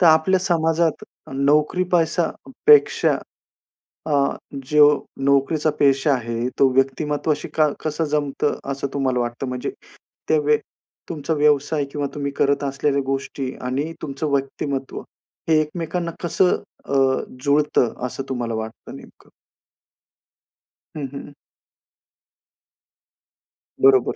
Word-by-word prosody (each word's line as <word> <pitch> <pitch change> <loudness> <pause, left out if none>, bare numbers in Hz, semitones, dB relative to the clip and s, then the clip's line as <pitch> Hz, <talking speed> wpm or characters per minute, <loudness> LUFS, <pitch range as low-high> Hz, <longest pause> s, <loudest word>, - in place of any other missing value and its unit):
तर 175 - +6
आपल्या 160 +4 +5
समाजात 165 -3 +1 0.3
नोकरी 150 +6 +2
पैसापेक्षा 175 - +3 0.9
अ, 160 - -3 0.6
जो 150 -1 +5 0.2
नोकरीचा 140 +3 +2
पेशा 140 +1 +3
आहे 115 -1 -2
तो 135 - +6
व्यक्तिमत्वाशी 145 +3 0
का 155 -1 +4
कसं 155 +1 -2
जमतं 145 0 0
असं 140 0 -3
तुम्हाला 130 -3 0
वाटतं? 120 +2 -3
म्हणजे 125 0 -3 0.6
ते 155 - +4
व्य 150 0 +3 0.5
तुमचा 160 -1 -2
व्यवसाय 145 0 +2
किंवा 145 -1 -2
तुम्ही 140 -1 -3
करत 140 0 +2
असलेल्या 140 0 0
गोष्टी 135 0 -3
आणि 135 +5 -2
तुमचं 145 +1 -3
व्यक्तिमत्व 135 0 -2 0.5
हे 155 -1 +5
एकमेकांना 170 +2 -3
कसं 180 +1 +3 0.3
अ, - - -5 0.5
जुळतं 145 -4 +2
असं 135 +2 -6
तुम्हाला 120 -3 -2
वाटतं 110 0 -7
नेमकं? - - -15 1.7
हं, 145 - -3
हं. 140 +1 -8 2.5
बरोबर. 130 -2 +5
145 Hz, 105 wpm, -22 LUFS, 135-155 Hz, 2.5 s, तर